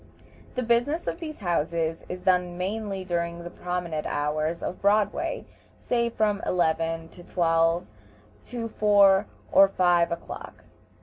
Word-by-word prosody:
The 255 - -1
business 240 +8 +1
of - - -3
these 310 -3 -6
houses 165 -2 -1
is 180 0 -5
done 180 -1 +1
mainly 195 0 -3
during 170 -1 -2
the 175 - -7
promenade 175 -3 -3
hours 155 +3 -1
of 180 - -4
Broadway, 205 0 +1 0.3
say 235 -1 0
from 215 -3 0
eleven 165 -1 0
or - - -12
twelve 165 -1 +2 0.6
to 235 -1 -4
four 205 -2 +4 0.2
or 195 - +7
five 175 -3 +2
o'clock. 170 - -7
180 Hz, 130 wpm, -26 LUFS, 170-210 Hz, 0.6 s, or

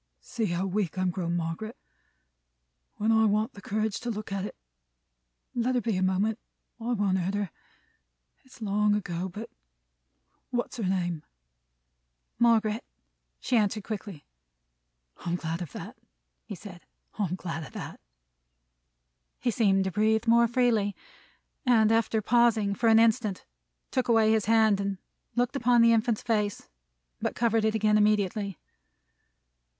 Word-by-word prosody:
"See 230 -3 -3
how 175 +1 -1
weak 190 -3 -2
I'm 185 -1 +1
grown, 170 -1 -2
Margaret, 175 +7 -4 1.2
when 215 +2 +1
I 220 0 +4
want 215 +3 +1
the 200 - -12
courage 215 +1 -2
to 245 - -5
look 215 -2 -5
at 195 -1 -2
it! - - -7 1.0
Let 245 +1 0
her 245 - +2
be, 225 -3 -1
a 185 - -1
moment. 195 +4 +1 0.4
I 235 +2 -2
won't 195 -4 +1
hurt 185 +3 -1
her. 205 -4 -2 0.9
It's 255 -3 -13
long 210 0 +2
ago, 180 -2 -3
but 210 +6 -8 1.0
What's 245 0 -3
her 220 - -2
name?" 175 -4 -1 1.2
"Margaret," 225 -1 +3 0.6
she 255 - -1
answered 215 -1 +1
quickly. 200 -7 -6 0.9
"I'm 170 0 -3
glad 165 0 -3
of 165 -6 -6
that," - - -8 0.5
he - - -7
said. 190 -4 -11 0.4
"I'm 185 -4 0
glad 165 -3 -5
of - - -11
that!" - - -7 1.4
He 240 - 0
seemed 195 -4 +3
to 190 - -2
breathe 220 +4 +2
more 235 0 +5
freely; 230 -4 +1 0.7
and 225 -5 +4
after 225 -1 +1
pausing 225 -3 +3
for 230 +2 +2
an 220 - +6
instant, 225 -3 +2 0.5
took 255 -2 0
away 225 -2 +4
his 220 -2 +2
hand, 220 -2 +4
and 200 -1 -2 0.4
looked 245 +2 0
upon 245 -3 +4
the 230 0 +6
infant's 225 -1 +1
face. 210 -3 -1 0.5
But - - -2
covered 225 -1 +2
it 220 0 +1
again, 215 -1 +3
immediately. 205 -2 +1
215 Hz, 145 wpm, -28 LUFS, 195-230 Hz, 1.4 s, an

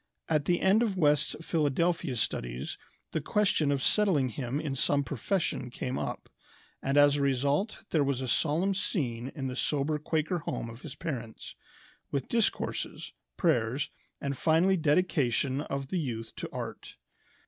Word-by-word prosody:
At 150 -3 +1
the 175 0 +2
end 195 +4 +5
of 210 -5 0
West's 150 -3 +3
Philadelphia 165 -1 +1
studies - - -3 0.3
the 160 - -1
question 165 -4 +2
of 140 -1 0
settling 180 -11 +3
him 125 +3 -3
in 150 -3 -2
some 140 +2 +2
profession 140 - -1
came 125 +1 -3
up, - - -4 0.5
and 135 +1 0
as 145 0 +6
a - - 0
result 140 - +1
there 155 -3 +3
was 140 -2 0
a 130 - -3
solemn 165 +9 +2
scene 130 - -2
in 135 -4 -4
the 130 -1 -3
sober 150 +2 0
Quaker 160 +3 0
home 115 -6 -4
of 115 +3 -12
his 150 - -8
parents, 125 -9 -5 0.6
with 140 -2 -2
discourses, 230 -2 -1 0.2
prayers, 135 -4 +1 0.3
and 140 0 -2
final 165 +7 +3
dedication 145 -5 +2
of 140 -2 -4
the 185 - 0
youth 115 -7 -4
to - - -4
art. - - -6
145 Hz, 155 wpm, -30 LUFS, 130-165 Hz, 0.6 s, as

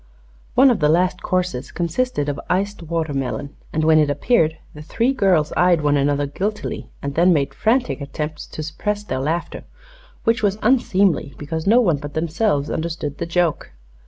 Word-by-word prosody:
One 265 +1 +7
of 235 - 0
the 150 -2 +3
last 180 +3 +2
courses 180 -8 -2
consisted 170 - -1
of 145 0 -2
iced 200 +1 -1
watermelon, 145 -4 -3 0.2
and 155 - -1
when 155 0 +5
it 150 -1 +3
appeared 160 - +2 0.2
the 150 - -10
three 235 - 0
girls 180 - +2
eyed 175 -2 +4
one 145 -1 +2
another 145 0 +1
guiltily 205 +9 -4
and 140 0 -3
then 175 +4 +4
made 140 -4 +1
frantic 240 - 0
attempts 150 +2 -5
to 155 - -6
suppress 205 +7 -3
their 170 - -3
laughter, 160 +5 -3 0.6
which 230 +1 +2
was 205 -1 +1
unseemly 200 - +2
because 160 +4 -4
no 235 +4 +6
one 175 -10 +2
but 145 +1 -8
themselves 160 -2 0
understood 160 -3 -4
the 170 - -3
joke. 170 -2 0
165 Hz, 170 wpm, -21 LUFS, 145-195 Hz, 0.6 s, One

